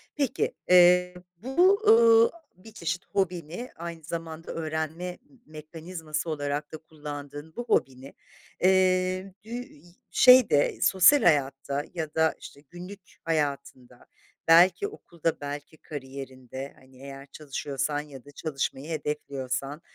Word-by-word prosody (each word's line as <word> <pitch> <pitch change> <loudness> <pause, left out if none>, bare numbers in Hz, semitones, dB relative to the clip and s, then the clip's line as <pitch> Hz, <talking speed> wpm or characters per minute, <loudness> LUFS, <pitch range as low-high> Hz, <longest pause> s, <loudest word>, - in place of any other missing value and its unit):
Peki. 280 -5 -1 0.2
Eee, 180 0 +6 0.2
bu, 345 - +3
ııı, 230 0 +7
a 340 -1 -19 0.2
bir 220 - -12
çeşit 175 -2 -4
hobini, 180 - -3
aynı 170 -1 -8
zamanda 165 0 -6
öğrenme 160 +2 -4 0.2
m 270 - -22
mekanizması 160 +1 -6
olarak 145 0 -3
da 155 - -6
kullandığın 145 -1 -9
bu 240 - -4
hobini, 130 - -1 0.5
eee, 185 0 +2
bü - - -14
i 240 -11 -8 0.3
şeyde, 250 - +5
sosyal 195 +8 +5
hayatta 140 -2 +1
ya 160 -3 -4
da 160 0 +3
işte 140 - -12
günlük 180 +3 -10 0.2
hayatında, 140 -5 -3 0.4
belki 180 - +6
okulda, 170 - -4
belki 145 +2 -7
kariyerinde, 135 -2 -8
hani, 130 0 -20
eğer 140 0 -10
çalışıyorsan 145 -1 -3
ya 140 -4 -13
da 145 - -13
çalışmayı 140 0 -4
hedefliyorsan 140 -2 -4
160 Hz, 120 wpm, -27 LUFS, 145-180 Hz, 0.5 s, ııı